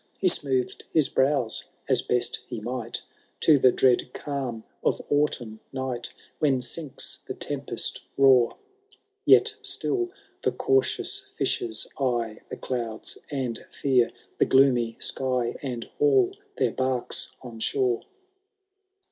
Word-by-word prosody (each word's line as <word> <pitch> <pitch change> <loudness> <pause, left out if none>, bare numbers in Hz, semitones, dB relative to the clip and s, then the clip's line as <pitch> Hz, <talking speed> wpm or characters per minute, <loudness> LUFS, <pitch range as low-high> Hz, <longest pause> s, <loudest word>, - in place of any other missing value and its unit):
He 185 - +4
smoothed 130 -6 0
his 155 -3 +4
brows, 130 -4 +1 0.2
as - - +3
best 125 -1 +1
he 120 -3 -5
might, 120 +1 -4 0.4
To 150 -3 +6
the 130 -1 +6
dread 125 0 +2
calm 130 -6 -4 0.2
of - - +1
autumn 130 -7 0
night, 130 -3 -3 0.3
When 140 -4 +3
sinks 135 +4 -1
the - - -4
tempest - - -2 0.2
roar; 130 -3 +5 0.7
Yet 425 +1 +6
still 385 -2 +1 0.3
the - - +1
cautious 400 -1 +1
fishers 390 -2 -1
eye 120 -5 0
The - - -6
clouds, 115 -4 -4
and 130 -6 -3
fear 130 -4 +2 0.3
the - - +5
gloomy 125 -4 +4
sky. 125 -3 0
And 125 -4 -4 0.2
haul 400 -3 +4 0.2
their - - +2
barks 130 -2 -1
on 120 -3 -9
shore. 125 0 +1
130 Hz, 120 wpm, -26 LUFS, 120-150 Hz, 0.7 s, To